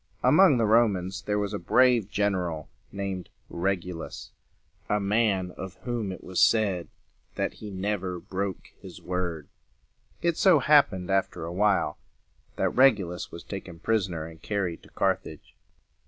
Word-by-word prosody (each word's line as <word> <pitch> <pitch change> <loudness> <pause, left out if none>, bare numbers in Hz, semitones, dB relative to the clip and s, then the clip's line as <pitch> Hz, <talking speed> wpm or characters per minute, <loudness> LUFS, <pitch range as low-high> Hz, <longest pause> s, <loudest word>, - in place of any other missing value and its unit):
Among 185 -9 +6
the 115 - +2
Romans 105 -4 +2
there 105 0 -1
was 105 0 -2
a 100 - -2
brave 125 -5 +3
gen 100 -1 +1
er 90 -2 -1
al 75 -2 -7 0.2
named 100 -2 -4 0.2
Reg´u 90 0 -1
lus, 80 - -8 0.6
a 105 - +2
man 100 -3 +1
of 95 +1 -8
whom 120 -5 -2
it 95 - -9
was 95 -1 -1
said 100 -6 +3 0.5
that - - -1
he 105 - -6
never 95 -2 -3
broke 95 +1 -4
his - - -10
word. 90 -5 -3 0.8
It 170 -1 +1
so 190 -6 +6
happened 130 -11 +3
after 95 -4 0
a 85 - -5
while, 100 +1 +1 0.6
that - - +1
Reg 130 -3 +5
u 95 -4 -5
lus 90 0 -6
was 85 - -9
taken 95 -4 -7
pris 105 +2 +1
on 90 - -6
er 80 -1 -4
and 80 0 -12
carried 95 -5 -2
to - - -18
Carthage. - - -2
95 Hz, 170 wpm, -27 LUFS, 90-110 Hz, 0.8 s, Among